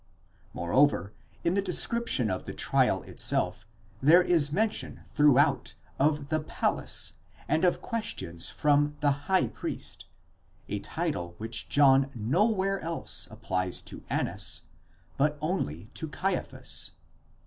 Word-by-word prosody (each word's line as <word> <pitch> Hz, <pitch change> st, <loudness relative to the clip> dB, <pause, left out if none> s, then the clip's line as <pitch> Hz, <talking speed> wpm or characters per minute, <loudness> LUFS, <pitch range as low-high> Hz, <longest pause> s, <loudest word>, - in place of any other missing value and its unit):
Moreover 100 Hz, +1 st, +2 dB, 0.3 s
in 170 Hz, -, +2 dB
the 200 Hz, -, +2 dB
description 185 Hz, -, +2 dB
of 95 Hz, -, -4 dB
the -, -, -6 dB
trial -, -, +1 dB
itself, 100 Hz, +5 st, -2 dB, 0.3 s
there 165 Hz, +6 st, +7 dB
is 160 Hz, -5 st, +3 dB
mention 215 Hz, +6 st, -1 dB
throughout 145 Hz, -6 st, +3 dB, 0.2 s
of 145 Hz, 0 st, +1 dB
the 155 Hz, -, +1 dB
palace 150 Hz, -, -1 dB, 0.3 s
and 155 Hz, +3 st, +1 dB
of 180 Hz, -, +2 dB
questions 85 Hz, -, -2 dB
from 145 Hz, 0 st, +2 dB
the 145 Hz, -1 st, +4 dB, 0.2 s
Azgh 190 Hz, -1 st, +2 dB
priest, -, -, -3 dB, 0.6 s
a -, -, -3 dB
title 85 Hz, 0 st, -3 dB
which 110 Hz, +2 st, -4 dB
John 135 Hz, -1 st, +5 dB
nowhere 190 Hz, -, +1 dB
else 165 Hz, 0 st, -2 dB
applies 90 Hz, -1 st, -1 dB
to -, -, -5 dB
Annas, 90 Hz, -5 st, -1 dB, 0.5 s
but 150 Hz, +2 st, +2 dB
only 150 Hz, -, -2 dB
to 160 Hz, -, -2 dB
Caiaphas. 185 Hz, +4 st, -1 dB
145 Hz, 120 wpm, -28 LUFS, 110-175 Hz, 0.6 s, there